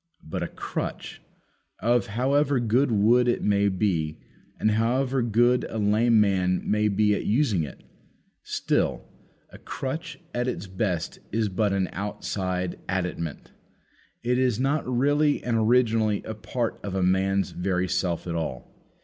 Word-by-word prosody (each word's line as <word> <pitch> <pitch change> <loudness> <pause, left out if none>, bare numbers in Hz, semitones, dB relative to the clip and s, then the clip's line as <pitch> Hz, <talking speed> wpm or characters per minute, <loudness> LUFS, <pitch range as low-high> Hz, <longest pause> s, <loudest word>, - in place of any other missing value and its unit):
But 80 - -5
a - - -1
crutch, - - -5 0.6
of 120 +1 +1
however 135 +5 +1
good 120 +3 +2
wood 115 +4 +4
it 120 - +1
may 100 0 +3
be 90 -5 0
made, - - -22 0.4
and 110 - +2
however 125 +4 +1
good 120 +2 +3
a - - -5
lame 110 +2 +3
man 95 -3 +2
may 105 0 +2
be 105 +1 +2
at - - -2
using 110 - +2
it 75 - -7 0.6
still, - - -1 0.5
a - - -12
crutch 160 +6 -5
at 120 +1 -1
its 125 - -3
best 95 -3 -2
is 110 0 0
but 100 +2 0
an 95 -1 +1
outside 95 -2 -3
additament; 90 -4 -3 0.7
it 125 +1 +1
is 125 -4 +1
not 140 +2 0
really 145 +4 +2
and 120 -2 0
originally 110 -2 +2
a 110 - -5
part 115 +2 -3
of 100 -2 -5
a 95 - +1
man's 95 +1 +1
very 90 0 -1
self 85 -2 -1
at 85 - -3
all. 80 -6 -4
105 Hz, 150 wpm, -26 LUFS, 95-125 Hz, 0.7 s, wood